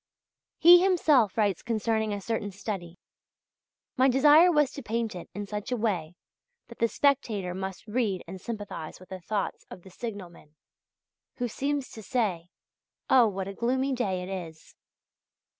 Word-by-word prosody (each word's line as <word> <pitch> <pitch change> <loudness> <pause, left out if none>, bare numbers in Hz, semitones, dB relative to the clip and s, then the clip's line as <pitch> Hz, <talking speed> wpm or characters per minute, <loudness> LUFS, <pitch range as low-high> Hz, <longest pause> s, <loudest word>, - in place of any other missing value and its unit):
He 350 +2 +8
himself 305 - +3
writes 205 -5 +1
concerning 220 -1 -1
a 205 - -2
certain 220 0 -3
study: 190 -3 -6 1.0
"My 260 +1 +5
desire 295 +7 +6
was 295 -4 +3
to 280 - -8
paint 230 -1 -2
it 180 - -9
in 205 0 -4
such 210 +3 -5
a 250 - 0
way 180 -7 -2 0.5
that 235 - -13
the 230 - +3
spectator 225 -9 0
must 190 +1 -6
read 210 -4 -1
and 185 +1 -8
sympathize 205 -8 -6
with 185 - -16
the 190 - -7
thoughts 205 +3 -3
of 180 - -11
the 190 - -14
signalman... 180 -9 -8 0.8
who 245 - -2
seems 280 +3 -2
to 220 - -9
say: 195 -7 -1 0.6
'Oh, 250 -3 +7
what 195 -2 -4
a 195 - -5
gloomy 260 +5 0
day 190 -8 -1
it 180 - -7 0.2
is! 160 0 -17
215 Hz, 160 wpm, -28 LUFS, 190-250 Hz, 1.0 s, He